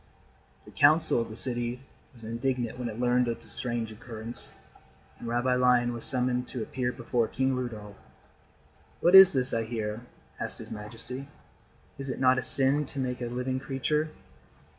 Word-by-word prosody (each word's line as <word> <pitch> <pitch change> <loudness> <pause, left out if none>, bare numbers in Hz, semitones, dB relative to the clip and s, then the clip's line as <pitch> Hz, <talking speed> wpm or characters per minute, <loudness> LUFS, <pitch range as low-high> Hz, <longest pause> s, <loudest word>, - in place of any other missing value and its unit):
The - - -14
Council 155 -3 +3
of 115 - -5
the 110 - -9
city 120 0 -3 0.3
was 120 -3 -17
indignant 120 +1 -3
when 120 -1 -3
it 110 +1 -8
learned 125 0 +2
of 115 - -3
the - - -18
strange 120 -2 -4
occurrence, 115 +1 -8 0.7
and - - -8
Rabbi 120 +2 0
Lion 125 -1 +2
was 115 - +5
summoned 125 -1 +4
to 125 -4 -5
appear 125 +1 -3
before 120 -1 -2
King 130 +2 -1
Rudolf. 110 -5 -6 1.0
"What 175 - +2
is 190 -1 +10
this 130 -1 -1
I 115 - 0
hear," 110 -1 -4 0.4
asked - - -4
his - - -11
majesty. 115 +5 -8 0.7
"Is 135 0 -5
it 130 - -4
not 130 0 +3
a - - -2
sin 140 +2 +6
to 140 - -10
make 125 -2 -3
a 120 - -3
living 125 +2 -3
creature?" 140 +3 -2
125 Hz, 170 wpm, -27 LUFS, 115-130 Hz, 1.0 s, is